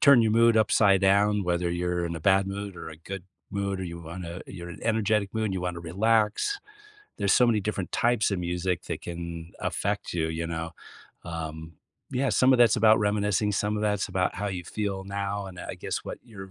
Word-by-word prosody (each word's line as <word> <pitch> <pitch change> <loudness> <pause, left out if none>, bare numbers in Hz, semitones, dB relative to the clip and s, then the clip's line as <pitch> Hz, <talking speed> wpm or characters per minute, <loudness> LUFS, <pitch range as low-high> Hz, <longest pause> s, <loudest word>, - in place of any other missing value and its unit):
turn 140 -5 +7
your 110 -1 +2
mood 115 0 +5
upside 100 -2 +4
down, 100 +1 +3
whether 85 0 0
you're 90 0 -1
in 85 0 -3
a 80 - -7
bad 95 +2 +4
mood 100 -1 -5
or - - -7
a 80 - -9
good 95 +3 -7 0.3
mood 100 -1 -2
or - - -3
you 85 -1 -6
wanna 85 +2 -7
you're 85 -2 -8
in - - -7
an - - -15
energetic 105 -2 +1
mood, 110 -1 0
and 95 - -2
you 90 - -2
wanna 90 -1 -3
relax. 110 - +1 0.6
There's 100 -2 +2
so 125 - +5
many 110 -3 +3
different 100 -2 -3
types 120 -3 +2
of 100 - -1
music 90 0 -1
that 85 - -5
can 85 -1 -6
affect - - -2
you, 80 -2 +1
you 80 +1 -3
know. 80 0 -4 0.5
Um, 80 -1 -6 0.4
yeah, 135 +2 0
some 130 +1 +5
of 125 - +4
that's 120 -1 +6
about 110 0 +6
reminiscing, 105 0 +1
some 105 +2 0
of 105 - -2
that's 105 -2 0
about 90 0 0
how 100 +2 -2
you 90 -2 -4
feel 100 -2 -3
now 100 0 -3
and, 90 -1 -10
uh, - - -7
I - - -4
guess, - - -3
what - - -7
you're 95 -4 -10
95 Hz, 220 wpm, -27 LUFS, 85-105 Hz, 0.6 s, turn